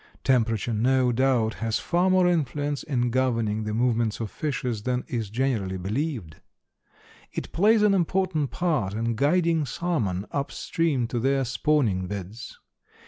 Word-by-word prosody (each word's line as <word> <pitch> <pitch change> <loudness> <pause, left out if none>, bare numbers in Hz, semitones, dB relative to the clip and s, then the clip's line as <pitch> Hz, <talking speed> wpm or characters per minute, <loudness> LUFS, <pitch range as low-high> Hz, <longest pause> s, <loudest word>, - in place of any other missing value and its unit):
Temperature 115 -3 +1
no 125 +3 +2
doubt 120 -3 +2
has 115 -1 -1
far 175 +2 +1
more 185 -1 +4
influence 145 -3 0
in 125 -5 -1
governing 115 -4 0
the 105 - -2
movement 115 -2 +1
of 110 -3 -4
fishes 125 -7 -3
than 125 +2 -1
is 115 -5 -3
generally 110 -5 -1
believed. 105 - -3 1.0
It - - -5
plays 210 +4 +4
an 210 -1 +5
important 180 -5 0
part 145 - -1
in 115 +1 -1
guiding 165 +4 +2
salmon 110 - -1
up 140 -1 -2
stream 155 -7 0
to 120 - -1
their 135 +2 +1
spawning 120 -8 +1
beds. 100 +4 -7
125 Hz, 140 wpm, -25 LUFS, 110-150 Hz, 1.0 s, an